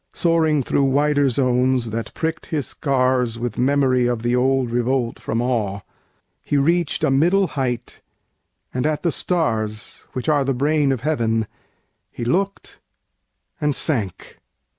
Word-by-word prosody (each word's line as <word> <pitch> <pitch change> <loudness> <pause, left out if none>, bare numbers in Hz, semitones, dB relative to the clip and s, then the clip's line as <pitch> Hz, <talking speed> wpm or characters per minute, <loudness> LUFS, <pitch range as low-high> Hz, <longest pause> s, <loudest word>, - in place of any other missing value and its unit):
Soaring 160 -4 +2
through 140 +3 +1
wider 145 +1 +2
zones 125 -1 +1
that 115 +1 -4
prick'd 160 0 -3
his 150 -5 -2
scars 130 -4 0
With 120 -1 -4
memory 130 -1 +2
of 120 -2 -2
the 120 +1 +1
old 130 -1 +1
revolt 120 0 0
from 115 +2 -2
Awe, 105 -6 -1
10 - - -38 0.6
He 145 - -1
reach'd 170 +3 +1
a - - +3
middle 175 +8 +3
height, 125 -4 -3 0.7
and 125 +3 0
at 155 -1 -2
the 170 - +2
stars, 110 - -2
Which 130 - -4
are 150 -2 +3
the 135 -1 -1
brain 145 +1 +2
of 130 - -2
heaven, 115 -7 0 0.7
he 120 - -5
look'd, 195 +10 -2 0.8
and 150 -2 +1
sank. 110 - -2
130 Hz, 145 wpm, -21 LUFS, 120-150 Hz, 0.8 s, a